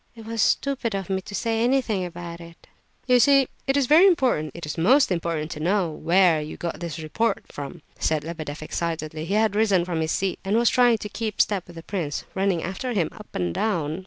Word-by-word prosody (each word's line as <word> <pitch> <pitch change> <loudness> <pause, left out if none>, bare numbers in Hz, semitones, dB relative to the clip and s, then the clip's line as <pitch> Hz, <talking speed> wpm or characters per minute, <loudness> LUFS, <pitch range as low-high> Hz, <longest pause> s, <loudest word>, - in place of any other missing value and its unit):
It 225 -1 -11
was 225 -1 -2
stupid 265 -5 +1
of 195 0 -4
me 190 0 0
to 200 +2 -8
say 225 +1 0
anything 245 -6 +1
about 170 -1 -7
it." 170 0 -14 0.4
"You 250 -1 +4
see, 275 +2 +5 0.2
it 270 +1 +2
is 280 - +3
very 320 +9 +7
important, 250 - +2
it 170 - -6
is 150 - -4
most 245 - +4
important 165 -2 -2
to 150 - -6
know 180 +1 +1
where 170 0 +3
you 150 - -7
got 170 -3 -4
this 170 -3 -5
report 165 +9 -1
from," 145 +3 -8 0.2
said 155 -2 0
Lebedeff, 155 -2 -6
excitedly. 155 -1 -3
He 195 - -1
had 215 -1 +2
risen 200 -5 +3
from 170 -3 -2
his 160 0 -1
seat, 195 -1 -1
and 200 +3 +1
was 235 0 +4
trying 245 -3 +4
to 210 - -6
keep 220 -1 -4
step 195 -4 +1
with 175 - -13
the 165 - -9
prince, 165 -8 -3
running 190 -3 0
after 195 +8 -3
him, 175 -7 +1
up 210 -1 -12
and 90 -2 -1
down. 165 - -1
185 Hz, 220 wpm, -24 LUFS, 165-225 Hz, 0.4 s, very